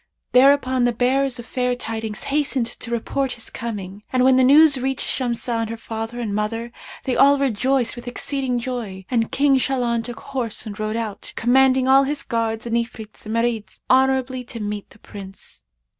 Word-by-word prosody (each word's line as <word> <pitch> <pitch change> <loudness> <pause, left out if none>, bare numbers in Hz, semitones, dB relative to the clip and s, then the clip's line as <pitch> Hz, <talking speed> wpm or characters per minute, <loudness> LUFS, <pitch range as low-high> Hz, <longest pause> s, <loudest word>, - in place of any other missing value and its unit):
Thereupon 260 -1 +4
the 245 - +3
bearers 255 +2 +1
of 240 - -8
fair 250 -1 -1
tidings 225 -3 -4
hastened 275 -4 0
to 235 +1 -7
report 255 +3 -1
his 230 - -8
coming 205 -4 -6
and 255 -1 +2
when 260 0 +5
the 260 - +5
news 285 +1 +6
reached 265 +1 -1
Shamsah 235 -2 -1
and 225 - -3
her 230 - -5
father 225 +1 -6
and 220 -4 -3
mother, 225 +3 -2 0.3
they 255 - -1
all 280 +1 +6
rejoiced 260 -1 +1
with 240 0 -10
exceeding 260 0 -2
joy, 235 -7 -5
and 230 -3 +1
King 275 -1 +3
Shahlan 245 -3 0
took 240 +1 -8
horse 255 -6 -4
and 210 -1 -7
rode 215 0 -2
out, 225 -3 -4
commanding 260 +2 +3
all 270 +1 +7
his 280 +2 -2
guards 225 -1 -2
and 235 -1 -1
Ifrits 220 -2 -6
and 220 - -3
Marids 230 -4 -1
honourably 260 -1 +2
to 235 - -8
meet 210 -1 -4
the - - -18
Prince." 195 -2 -11
240 Hz, 185 wpm, -22 LUFS, 225-265 Hz, 0.3 s, all